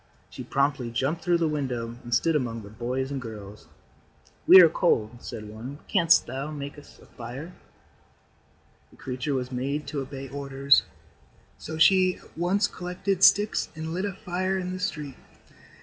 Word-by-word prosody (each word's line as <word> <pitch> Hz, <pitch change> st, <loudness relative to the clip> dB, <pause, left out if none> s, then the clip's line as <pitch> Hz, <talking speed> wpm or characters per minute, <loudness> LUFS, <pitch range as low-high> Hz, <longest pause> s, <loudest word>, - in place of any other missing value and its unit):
She -, -, -8 dB
promptly 140 Hz, -3 st, 0 dB
jumped 135 Hz, +8 st, -2 dB
through 175 Hz, -1 st, +3 dB
the 165 Hz, -1 st, +1 dB
window 125 Hz, -6 st, -3 dB
and 120 Hz, -, -9 dB
stood 155 Hz, +7 st, +2 dB
among 115 Hz, -6 st, -2 dB
the 100 Hz, -, -11 dB
boys 125 Hz, +4 st, -3 dB
and 135 Hz, -2 st, -3 dB
girls. 105 Hz, -3 st, -10 dB, 0.8 s
"We 185 Hz, -, +11 dB
are 175 Hz, -, +9 dB
cold," 120 Hz, -8 st, 0 dB
said 105 Hz, -1 st, -7 dB
one. 115 Hz, +7 st, -8 dB
"Canst 170 Hz, -5 st, +4 dB
thou 135 Hz, +4 st, -5 dB
make 140 Hz, -2 st, -6 dB
a 145 Hz, -, -11 dB
fire 125 Hz, 0 st, -10 dB
for -, -, -10 dB
us?" 180 Hz, -, -17 dB, 1.3 s
The -, -, -21 dB
creature 130 Hz, +2 st, -3 dB
was 125 Hz, 0 st, -3 dB
made 140 Hz, +4 st, -2 dB
to 145 Hz, -1 st, -3 dB
obey 135 Hz, 0 st, -7 dB
orders, 140 Hz, 0 st, +3 dB, 0.8 s
so 160 Hz, -, -6 dB
she 185 Hz, +2 st, +5 dB
at -, -, -20 dB
once 185 Hz, +5 st, +1 dB
collected 180 Hz, +1 st, -3 dB
sticks 205 Hz, +2 st, +4 dB
and 160 Hz, +1 st, -5 dB
lit 185 Hz, +3 st, -2 dB
a 200 Hz, -, -3 dB
fire 185 Hz, 0 st, -2 dB
in 185 Hz, 0 st, -4 dB
the 185 Hz, -, -5 dB
street. 150 Hz, -8 st, -4 dB
140 Hz, 170 wpm, -26 LUFS, 125-175 Hz, 1.3 s, We